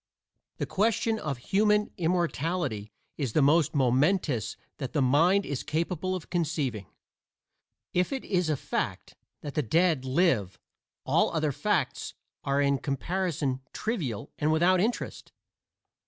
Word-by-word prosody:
The - - -1
question 220 +2 +1
of 140 -8 -3
human 210 - +2
immortality 165 - -1 0.3
is 130 -7 -2
the 155 - +4
most 150 +2 +3
momentous 135 - +2 0.2
that 135 -4 -4
the 150 - +2
mind 170 +10 +4
is 140 -3 -3
capable 170 +3 -2
of 180 - -8
conceiving. 145 - -1 1.1
If 180 +6 +1
it 270 -1 -3
is 180 -4 0
a 150 - +1
fact - - -3 0.3
that 145 -2 -6
the 150 - +1
dead 160 +2 +2
live 130 - +1 0.5
all - - +3
other 155 -2 +1
facts - - -1 0.3
are 140 0 +1
in 140 -1 +2
comparison 150 -1 -2
trivial 165 - -3
and 150 +1 +2
without 175 +4 +4
interest. 230 +4 -3
155 Hz, 130 wpm, -28 LUFS, 135-180 Hz, 1.1 s, the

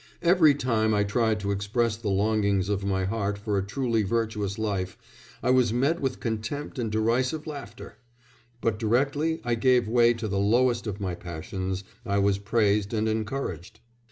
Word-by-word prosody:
Every 170 -4 +5
time 110 -5 +1
I 105 - +3
tried 110 +1 +1
to 100 0 -1
express 105 +3 0
the 110 -1 -4
longings 100 -1 +1
of 100 -1 -1
my 95 -1 0
heart 100 0 -1
for 105 0 -2
a 95 - +1
truly 115 +2 0
virtuous 105 -1 -1
life 100 -4 -2 0.5
I 125 - +3
was 125 -3 +4
met 140 +8 +1
with 130 -2 -2
contempt 115 +6 -4
and 115 -3 -2
derisive 125 +7 0
laughter; 140 -7 -8 0.6
but 110 -2 0
directly 140 +8 +1
I 120 - 0
gave 125 0 +3
way 120 +1 +4
to 115 -1 -4
the 100 -1 -1
lowest 120 +3 +2
of 100 -1 -4
my 95 -3 -2
passions 95 +3 -5 0.2
I 100 -3 -1
was 100 0 +2
praised 105 0 +1
and 110 0 0
encouraged.... 110 - -3
110 Hz, 170 wpm, -26 LUFS, 100-120 Hz, 0.6 s, Every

